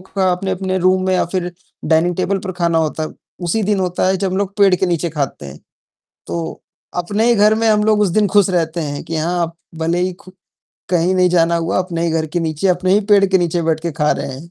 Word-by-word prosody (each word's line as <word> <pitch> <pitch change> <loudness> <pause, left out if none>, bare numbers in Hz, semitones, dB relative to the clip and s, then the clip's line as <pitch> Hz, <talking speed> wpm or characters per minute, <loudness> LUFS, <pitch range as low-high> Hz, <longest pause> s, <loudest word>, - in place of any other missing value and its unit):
का 190 0 -1
अपने-अपने 190 +1 -2
रूम 185 +1 +2
में 185 - +1
या - - +2
फिर 180 0 -3 0.3
डाइनिंग 165 +3 +2
टेबल 195 +1 0
पर 190 -2 -5
खाना 170 -2 +1
होता 155 0 -1
है, 155 - -2 0.3
उसी 195 +6 0
दिन 200 -1 +1
होता 180 0 0
है 190 - +2
जब 190 0 -2
हम 190 - -2
लोग 200 0 -2
पेड़ 195 -2 +5
के 185 - 0
नीचे 170 -1 -1
खाते 140 - -4
हैं। 70 +2 -10 0.7
तो, 165 -1 -5 0.4
अपने 205 +5 0
ही 240 - +5
घर 210 +1 +4
में 225 0 +1
हम 210 -1 +3
लोग 215 -1 +3
उस 205 - +3
दिन 210 +3 +2
खुश 200 0 +3
रहते 170 -2 -1
हैं 145 -1 -4
कि 165 - -5
हाँ, 175 +3 -1
आप 165 0 -3 0.2
भले 165 +2 0
ही 185 0 -1
खु 185 +1 -16 0.6
कहीं 180 +1 +2
नहीं 180 -1 +3
जाना 170 -1 +2
हुआ, 165 +1 -1
अपने 170 -2 -2
ही - - 0
घर 160 0 0
के 170 +3 -2
नीचे, 160 +3 -1
अपने 185 +1 +1
ही 205 - +4
पेड़ 200 -1 +6
के 190 0 +3
नीचे 175 -1 0
बैठ 160 -1 0
के 170 -1 -3
खा 150 -1 +1
रहे 135 - -4
हैं। 150 +6 -10
180 Hz, 250 wpm, -18 LUFS, 165-190 Hz, 0.7 s, पेड़